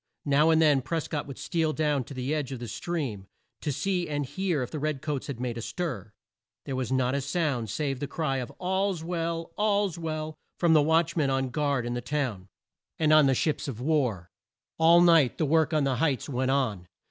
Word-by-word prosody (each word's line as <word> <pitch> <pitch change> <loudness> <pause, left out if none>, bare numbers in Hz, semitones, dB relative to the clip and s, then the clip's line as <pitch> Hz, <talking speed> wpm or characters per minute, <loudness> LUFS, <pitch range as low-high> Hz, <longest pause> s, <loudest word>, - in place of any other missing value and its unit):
Now 145 +2 +4
and 160 0 +4
then 150 -4 +4
Pres 160 +4 -3
cott 150 -3 -3
would 140 - -8
steal 160 -3 -1
down 150 -4 +1
to 140 - -9
the 130 +3 -2
edge 145 -4 -2
of 130 - -4
the 120 0 -7
stream, 130 - -4 0.3
to 150 - -1
see 180 +4 -1
and 145 -1 -1
hear 175 -1 -1
if 125 - -7
the 155 - -4
red 150 -1 -1
coats 150 -3 -3
had 135 -5 -5
made 120 -2 -3
a - - -5
stir. 115 - -4 0.5
There 135 - -3
was 130 -2 -2
not 130 -1 +1
a 140 - 0
sound 140 -5 -1
save 135 -1 -2
the 145 - -3
cry 135 -2 -1
of 125 -2 -4
"All's 190 -1 -1
well! 165 -1 -3
All's 205 -4 +1
well!" 155 -1 -3 0.2
from 170 -2 +3
the 155 - +6
watch 160 +2 +2
man 150 -5 +1
on 135 -1 0
guard 140 -3 0
in 120 - -2
the 120 - -3
town, 125 -8 -2 0.5
and 155 -1 +3
on 155 -2 +7
the 135 - +3
ships 150 +3 -1
of 125 -5 -5
war. 125 - 0 0.5
All 170 +1 +7
night 165 -7 +5
the 155 - +1
work 160 +2 +3
on 155 -2 +2
the 135 -2 0
heights 140 -3 0
went 130 -1 -1
on. 115 -10 0
145 Hz, 220 wpm, -27 LUFS, 130-160 Hz, 0.5 s, on